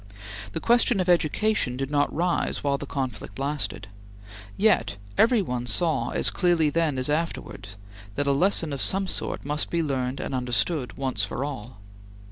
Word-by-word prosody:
The - - -2
question 240 -2 +4
of 185 - 0
education 175 -4 +2
did 135 +1 -3
not 145 0 +2
rise 175 +2 -1
while 140 -1 +1
the 145 - -6
conflict 130 -3 -4
lasted. 130 -9 -2 0.7
Yet 205 - +2 0.2
every 230 - +4
one 125 -5 -3
saw 135 0 +1
as - - +1
clearly 170 -5 +2
then 160 -3 +1
as 130 - +1
afterwards 145 - -3 0.4
that 145 - 0
a 140 - +3
lesson 160 +1 +2
of 140 - -3
some 195 +1 +2
sort 185 - -4
must 150 +1 0
be 170 -1 0
learned 130 -2 -2
and - - -4
understood, 125 +3 -1
once 130 -6 -1
for 120 +7 -2
all. 120 -6 -7
145 Hz, 165 wpm, -25 LUFS, 130-170 Hz, 0.7 s, question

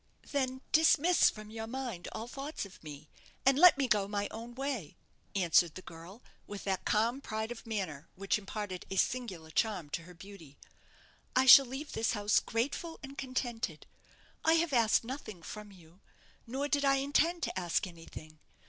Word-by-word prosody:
"Then 260 -2 -1
dismiss 320 +2 +5
from 215 0 -10
your 225 0 -6
mind 240 -7 -5
all 225 - -6
thoughts 275 0 -5
of 195 - -15
me, 150 -1 -10 0.4
and 270 0 +6
let 360 -3 +8
me 275 -2 +1
go 205 -4 +2
my 205 0 -2
own 230 +2 -8
way," 260 - -4 0.4
answered 175 -3 +3
the 185 - -8
girl, 170 +8 -12 0.2
with 205 -1 -7
that 190 -2 -2
calm 235 +5 +1
pride 220 -2 -4
of 235 -1 -9
manner 180 -9 -4
which 195 +2 0
imparted 195 -2 -5
a 195 - -4
singular 190 -8 -1
charm 180 -7 -1
to 170 - -3
her 180 0 -13
beauty. 170 -6 -13 0.8
"I 260 - +4
shall 270 0 +10
leave 270 +4 -6
this 225 0 0
house 205 -1 +3
grateful 285 +8 -3
and 275 +1 -8
contented; 255 -3 -3 0.6
I 320 - +5
have 330 -2 +2
asked 230 -3 +4
nothing 225 -8 -7
from 210 +4 -8
you, 175 0 -18 0.5
nor 270 +5 -2
did 285 -1 +1
I 275 -1 +4
intend 290 +5 +1
to - - -2
ask 175 +2 0
anything. 165 -3 -11
220 Hz, 175 wpm, -32 LUFS, 185-270 Hz, 0.8 s, shall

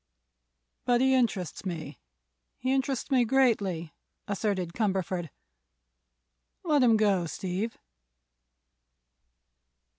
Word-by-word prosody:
"But 245 -1 +3
he 265 +1 +4
interests 225 -9 0
me—he 180 - -6
interests 270 0 -1
me 255 -2 +5
greatly," 210 -10 +1 0.3
asserted 195 -4 -1
Cumberford. 190 -5 -1 1.3
"Let 300 -5 +3
him 230 -3 +5
go, 195 -5 +2
Steve." 190 +7 -3
210 Hz, 80 wpm, -28 LUFS, 180-255 Hz, 1.3 s, me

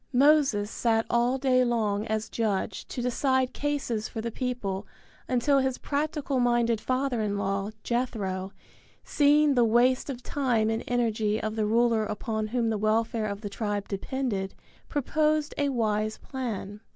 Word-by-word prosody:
Moses 265 -6 +4
sat 225 -1 +1
all 240 +2 +2
day 255 -1 +3
long 220 -3 0
as 220 0 -1
judge 210 -4 -2
to 245 - -4
decide 260 +1 +1
cases 275 -7 -2
for - - -6
the 230 +1 -3
people 220 -6 -3 0.4
until 265 +3 +3
his 265 -1 0
practical 290 -2 -1
minded 240 -2 +2
father 255 -2 0
in 205 -1 -1
law, 195 0 -1
Jethro, 200 -6 -2 0.5
seeing 295 0 +4
the 245 -2 +4
waste 245 +4 +3
of 250 -2 -5
time 240 -7 +1
and 225 +1 -2
energy 220 -3 +1
of 215 0 -3
the 215 -1 0
ruler 230 0 +3
upon 215 +1 -3
whom 230 0 0
the 215 - -1
welfare 220 +1 +1
of 200 0 -5
the 210 - -4
tribe 205 -1 -3
depended, 200 -2 -3 0.3
proposed 305 +1 +1
a 285 -1 +2
wise 215 -4 0
plan. 215 -6 -5
235 Hz, 150 wpm, -27 LUFS, 215-260 Hz, 0.5 s, Moses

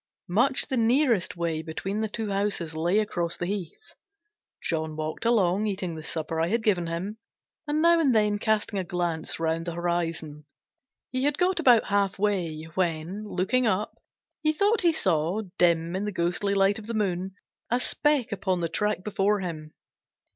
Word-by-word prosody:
Much 245 +9 +2
the 265 - -1
nearest 230 - +2
way 165 -2 -1
between 190 +6 -4
the 220 - -1
two 215 -1 -4
houses 195 -5 -1
lay 170 +5 +1
across 175 -6 -1
the 175 - -2
heath. 195 - -6 0.7
John 160 -2 -2
walked 155 +7 -4
along, 210 -3 +3
eating 190 -4 -3
the 160 - -7
supper 160 +1 -2
I 165 - +2
had 225 +4 0
given 185 -6 +2
him, 185 +6 -4 0.5
and 300 +2 +1
now 335 0 +6
and 275 -7 +3
then 210 -1 +2
casting 215 -2 0
a - - -1
glance 175 -3 -2
round 165 +1 -1
the 170 - -2
horizon. 165 -3 -2 0.7
He 255 +1 0
had 290 0 +1
got 360 0 +2
about 245 -8 +5
half 200 -1 +1
way, 180 -6 -1
when, 180 +3 -2
looking 230 +7 +1
up, 210 0 0 0.5
he 310 -1 +2
thought 410 +7 +2
he 345 -2 +5
saw, 185 - 0 0.2
dim 170 0 +3
in 195 +2 -2
the 210 - -2
ghosty 180 +3 0
light 195 +2 +3
of 215 - -11
the 230 - -3
moon, 190 -2 -1 0.3
a 245 - +2
speck 275 -2 +2
upon 190 -2 -1
the 170 -1 -1
track 210 +2 -1
before 205 0 +1
him. 155 -4 -6
195 Hz, 175 wpm, -26 LUFS, 170-220 Hz, 0.7 s, now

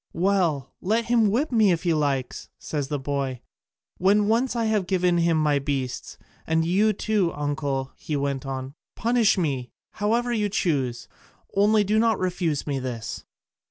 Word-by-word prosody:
"Well, 170 -7 +1
let 225 +5 +1
him 230 -3 +3
whip 265 +9 0
me 220 -5 +4
if 170 0 0
he 170 -2 +2
likes," 140 -4 -1
said 145 -3 -3
the 145 +1 -2
boy, 135 -2 -3 0.6
"when 205 +3 +3
once 240 +4 +1
I 230 -1 0
have 210 -4 +1
given 180 -2 +2
him 170 -1 +2
my 150 -2 +2
beasts: 135 -3 -4 0.3
and 160 0 +2
you 200 +6 +3
too, 205 -3 0
uncle," 145 -2 -2
he 155 - -4
went 140 -2 -1
on, 135 0 -5 0.2
"punish 230 -2 +2
me 135 -8 -1 0.2
however 235 +4 0
you 210 -3 0
choose, 135 - -1 0.5
only 210 +2 +4
do 210 +2 +2
not 225 -2 +3
refuse 175 -5 -1
me 140 -2 -2
this." 120 -4 -5
170 Hz, 160 wpm, -25 LUFS, 140-210 Hz, 0.6 s, me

